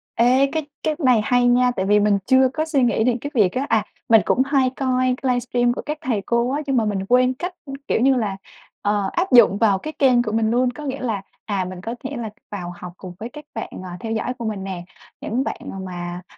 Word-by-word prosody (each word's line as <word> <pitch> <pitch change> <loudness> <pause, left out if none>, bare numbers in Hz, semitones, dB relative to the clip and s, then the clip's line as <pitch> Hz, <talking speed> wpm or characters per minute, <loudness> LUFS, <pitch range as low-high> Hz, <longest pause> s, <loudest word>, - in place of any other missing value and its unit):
Ê, 255 +4 +4
cái 315 -2 -2 0.2
cái 310 - 0
này 255 -7 +4
hay 245 +1 +3
nha, 250 +1 +4
tại 190 0 -1
vì 210 +1 +4
mình 205 -1 +3
chưa 260 0 +5
có 315 - 0
suy 295 -5 +1
nghĩ 235 -2 +2
đến 245 0 +2
cái 285 - -5
việc 200 -6 +3
á, 265 +2 -2
à, 215 -1 +2 0.2
mình 225 -2 +7
cũng 260 - +2
hay 270 -2 +2
coi 255 -1 +1
cái 260 - +1
livestream 245 0 +1
của - - -5
các 300 +1 -3
thầy 240 -10 -1
cô 235 +1 +1
á, 290 - -1
nhưng 270 -2 +1
mà 225 - +3
mình 200 -2 -1
quên 250 +1 +4
cách, 355 +6 -5 0.3
kiểu - - +1
như 265 +2 +4
là, 210 -5 -1 0.5
ờ, 205 -1 +1
áp 355 -3 -1
dụng 235 -5 +7
vào 205 -4 +3
cái 310 +9 -6
kênh 255 -3 +4
của 215 -3 -4
mình 220 0 +1
luôn. 245 +1 +2
Có 295 +4 -9
nghĩa 275 0 -4
là, 220 -6 -2 0.2
à, 195 -3 -1
mình 185 0 -7
có 225 +4 -5
thể 275 +1 -4
là 225 -3 -4 0.2
vào 180 -4 -5
học 180 0 -9
cùng 180 -2 -9
với 225 - -6
các 300 0 -10
bạn, - - -4 0.2
à, 180 -1 -7
theo 225 +2 -4
dõi 235 +3 -2
của 235 - -5
mình 210 -3 -3
nè, 180 -2 -5 0.4
những 250 +5 -1
bạn - - -4 0.2
mà, 175 -1 -6
240 Hz, 255 wpm, -21 LUFS, 205-260 Hz, 0.5 s, mình